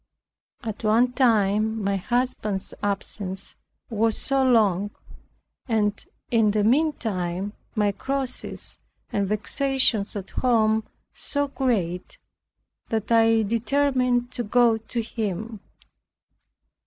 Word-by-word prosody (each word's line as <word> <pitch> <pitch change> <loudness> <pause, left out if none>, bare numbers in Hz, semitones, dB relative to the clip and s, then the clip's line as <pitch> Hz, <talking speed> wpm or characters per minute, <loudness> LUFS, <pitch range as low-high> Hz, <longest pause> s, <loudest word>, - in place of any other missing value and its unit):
At 220 -2 -5
one 230 +4 +4
time 220 -3 +2
my 200 0 +1
husband's 215 -2 -1
absence 195 -1 -3 0.3
was 225 0 +1
so 275 -1 +1
long, 205 -6 +3 0.8
and 210 -3 0 0.3
in 225 -3 +4
the 210 0 +1
meantime 205 - 0 0.2
my 210 -2 +2
crosses 265 +5 -4 0.3
and 200 -1 0
vexations 220 0 +1
at 195 -2 -6
home 220 -3 +2 0.3
so 285 -1 -2
great, 195 -11 -1 0.7
that 220 0 -2
I 225 -1 +5
determined 245 +2 +1
to 240 - -3
go 230 0 +3
to 230 +2 -3
him. 220 0 -4
220 Hz, 100 wpm, -25 LUFS, 205-245 Hz, 0.8 s, I